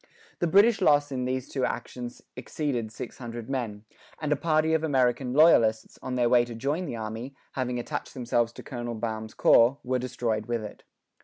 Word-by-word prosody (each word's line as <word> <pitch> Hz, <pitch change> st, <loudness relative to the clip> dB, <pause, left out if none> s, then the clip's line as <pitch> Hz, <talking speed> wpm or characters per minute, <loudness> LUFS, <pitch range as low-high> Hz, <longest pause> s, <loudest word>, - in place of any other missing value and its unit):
The 175 Hz, -, +1 dB
British 200 Hz, +4 st, +5 dB
loss 145 Hz, -4 st, +4 dB
in 125 Hz, -2 st, -2 dB
these 130 Hz, 0 st, -2 dB
two 135 Hz, -, -3 dB
actions 120 Hz, 0 st, -4 dB
exceeded 125 Hz, -4 st, -3 dB
six 115 Hz, -, -8 dB
hundred 120 Hz, -2 st, -7 dB
men: 110 Hz, -6 st, -3 dB, 0.4 s
and 150 Hz, -2 st, -2 dB
a -, -, +5 dB
party 155 Hz, +1 st, +1 dB
of 160 Hz, 0 st, +1 dB
American 130 Hz, -3 st, +1 dB
loyalists, 120 Hz, -7 st, +4 dB
on 130 Hz, -1 st, -4 dB
their 120 Hz, -1 st, +2 dB
way 120 Hz, 0 st, +5 dB
to 120 Hz, -1 st, -7 dB
join 145 Hz, +9 st, -2 dB
the -, -, -4 dB
army, 115 Hz, +4 st, -6 dB, 0.2 s
having 125 Hz, -2 st, -2 dB
attached 120 Hz, -, -5 dB
themselves 120 Hz, -2 st, 0 dB
to -, -, -10 dB
Colonel 120 Hz, -3 st, -5 dB
Baum's 110 Hz, -1 st, -4 dB
corps, 120 Hz, +4 st, +5 dB
were 130 Hz, 0 st, 0 dB
destroyed 115 Hz, -3 st, -2 dB
with 120 Hz, -2 st, -2 dB
it. 105 Hz, -, -9 dB
125 Hz, 185 wpm, -27 LUFS, 115-140 Hz, 0.4 s, British